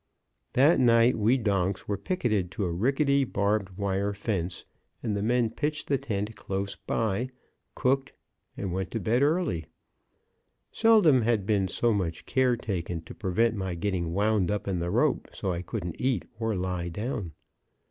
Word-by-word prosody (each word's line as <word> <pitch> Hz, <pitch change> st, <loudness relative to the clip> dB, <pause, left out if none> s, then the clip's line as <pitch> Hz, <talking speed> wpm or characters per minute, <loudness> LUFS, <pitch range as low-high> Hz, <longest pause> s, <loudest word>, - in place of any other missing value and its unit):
That 145 Hz, +6 st, +5 dB
night 120 Hz, 0 st, +5 dB
we 115 Hz, +5 st, +3 dB
donks 100 Hz, -4 st, 0 dB
were 105 Hz, -, 0 dB
picketed 105 Hz, -, -1 dB
to 100 Hz, -, -1 dB
a 85 Hz, -, -1 dB
rickety, 140 Hz, -, +2 dB
barbed 100 Hz, -4 st, -1 dB
wire 100 Hz, 0 st, 0 dB
fence, 95 Hz, -4 st, -3 dB, 0.4 s
and 110 Hz, -4 st, -1 dB
the 100 Hz, -, -1 dB
men 120 Hz, +1 st, +2 dB
pitched 150 Hz, +1 st, -2 dB
the 140 Hz, -2 st, +2 dB
tent 105 Hz, -1 st, -3 dB
close 100 Hz, 0 st, -3 dB
by, 115 Hz, +3 st, -1 dB, 0.5 s
cooked, 135 Hz, +1 st, +1 dB, 0.5 s
and 95 Hz, -3 st, -3 dB
went 95 Hz, -1 st, -2 dB
to 115 Hz, -, -3 dB
bed 115 Hz, +6 st, +1 dB
early. 145 Hz, -, +1 dB, 1.0 s
Seldom 210 Hz, -, +5 dB
had 110 Hz, -3 st, +1 dB
been 100 Hz, -2 st, +2 dB
so 115 Hz, +5 st, +1 dB
much 85 Hz, -5 st, -2 dB
care 130 Hz, -2 st, +2 dB
taken 90 Hz, -6 st, -3 dB
to 80 Hz, -, -11 dB
prevent 110 Hz, +3 st, +1 dB
my 95 Hz, -3 st, -3 dB
getting 90 Hz, -2 st, -1 dB
wound 100 Hz, 0 st, +2 dB
up 105 Hz, -1 st, -2 dB
in 95 Hz, -3 st, 0 dB
the 85 Hz, +1 st, -2 dB
rope -, -, +1 dB
so 95 Hz, -, -2 dB
I 85 Hz, -, -3 dB
couldn't 90 Hz, -4 st, -5 dB
eat 125 Hz, -7 st, +1 dB
or 110 Hz, -2 st, 0 dB
lie 90 Hz, -1 st, -2 dB
down. 105 Hz, -, -4 dB
105 Hz, 165 wpm, -28 LUFS, 95-120 Hz, 1.0 s, That